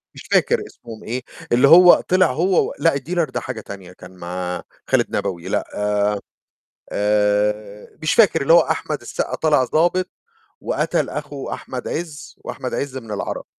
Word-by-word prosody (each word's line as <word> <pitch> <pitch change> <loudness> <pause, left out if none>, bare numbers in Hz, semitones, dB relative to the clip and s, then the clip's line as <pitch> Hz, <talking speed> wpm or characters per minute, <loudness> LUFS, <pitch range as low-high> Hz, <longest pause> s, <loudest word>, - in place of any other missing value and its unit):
مش - - -10
فاكر - - +3
اسمهم 115 -2 -12
إيه، 125 +3 -4 0.3
اللي 125 +4 +5
هو 180 +2 +9 0.2
طِلِع 185 -5 +4
هو 175 +6 +2
و - - -7
لأ، 165 -4 +3
الديلر 165 +4 -1
ده - - -3
حاجة 125 -4 -6
تانية 95 -3 -10
كان 90 0 -13
مع 90 0 -4 0.3
خالد - - +1
نبوي، 85 -2 -3
لأ، - - -1 1.3
آآ، 105 0 0
مش 155 - +1
فاكر 200 -9 +4
اللي 150 - +3
هو 170 - +8
أحمد - - -2
السقا - - -4
طالع 150 -4 +3
ضابط 175 +6 +1 0.5
وقتل - - -1
أخو 145 -2 -6
أحمد 125 -1 -6
عز 160 -3 -6
وأحمد 130 -2 -5
عز 140 -2 -3
من 115 -3 -11
العرب. 100 - -4
130 Hz, 160 wpm, -21 LUFS, 105-165 Hz, 1.3 s, هو